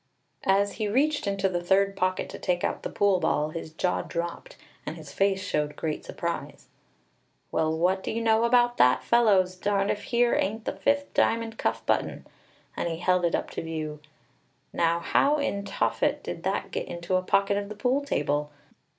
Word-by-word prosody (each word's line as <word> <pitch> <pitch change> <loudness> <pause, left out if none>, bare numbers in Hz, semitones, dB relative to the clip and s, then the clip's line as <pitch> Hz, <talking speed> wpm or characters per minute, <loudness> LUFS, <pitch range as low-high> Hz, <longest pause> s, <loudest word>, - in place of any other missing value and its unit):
As 200 +1 +3
he 215 -1 -1
reached 280 +4 +1
into 195 -1 +1
the 175 -2 -2
third 195 +2 +2
pocket 185 0 0
to - - -8
take 175 -1 -1
out - - -1
the - - -4
pool 200 -2 +2
ball, 150 -3 +1
his 160 0 -6
jaw 180 +3 0
dropped, 170 0 -5 0.3
and 155 - -5
his 150 -3 -11
face 195 -1 +1
showed 150 -1 -1
great 155 -2 -3
surprise. 170 0 -5 0.9
"Well, 160 0 +1
what 185 +3 +2
do - - -5
you 225 - -1
know 225 0 +3
about 240 0 +3
that, 125 +1 +4
fellows! 200 -6 +3
Darned 200 +1 0
if 205 - -4
here 240 0 +2
ain't 220 +3 -1
the - - 0
fifth 280 +9 0
diamond 225 -1 +1
cuff - - -1
button!" - - -1 0.5
And 170 - -2
he 165 - -3
held 180 +1 +2
it 170 - +1
up - - -3
to - - -4
view. 155 -2 -5 0.7
"Now 170 0 +2
how 285 - +3
in 200 -8 -2
Tophet - - 0
did - - -5
that - - -2
get - - -3
into 170 +2 -3
a 185 - +3
pocket 200 +2 +2
of 200 0 -3
the 215 - -7
pool 255 +6 +1
table? 150 - -1
195 Hz, 190 wpm, -27 LUFS, 170-220 Hz, 0.9 s, that